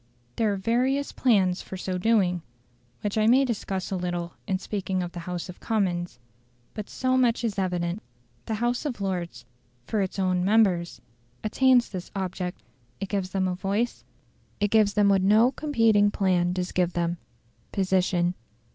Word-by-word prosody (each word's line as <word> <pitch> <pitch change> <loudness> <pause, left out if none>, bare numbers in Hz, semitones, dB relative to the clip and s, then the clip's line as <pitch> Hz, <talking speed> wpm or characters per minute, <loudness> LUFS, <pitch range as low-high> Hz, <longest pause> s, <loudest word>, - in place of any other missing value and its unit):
There 220 -2 +1
are - - 0
various 250 +8 0
plans 195 -7 +2
for 190 - -8
so 185 0 -3
doing, 185 -4 +2 0.6
which 205 +1 -1
I 215 - +3
may 260 +4 +5
discuss 200 -6 -3
a - - 0
little 175 -1 -3
in 190 -2 +1
speaking 190 -1 -2
of 175 - -5
the 175 - -7
House 175 -1 -4
of 180 - -10
Commons. 180 - -1 0.6
But 210 -2 -6
so 255 0 0
much 240 -2 +2
is 215 -4 -1
evident: 180 +1 -1 0.5
the 220 - -1
House 240 +2 0
of 280 -7 -4
Lords, 175 -11 -3 0.4
for 210 - 0
its 190 0 -3
own 185 -2 +1
members, 190 -4 +2 0.4
attains 250 +2 +4
this 185 -2 -6
object; 185 -2 -4 0.4
it 195 - -4
gives 195 -3 -1
them 190 -1 0
a 185 - -1
voice, 195 - -2 0.6
it 205 -1 +1
gives 210 -3 +4
them 205 -1 +4
what 195 -1 +4
no 215 +6 +5
competing 225 -9 +3
plan 180 -3 +1
does 180 0 -2
give 180 -1 +1
them 170 0 -1 0.5
POSITION. 185 -2 +1
195 Hz, 165 wpm, -26 LUFS, 180-220 Hz, 0.6 s, may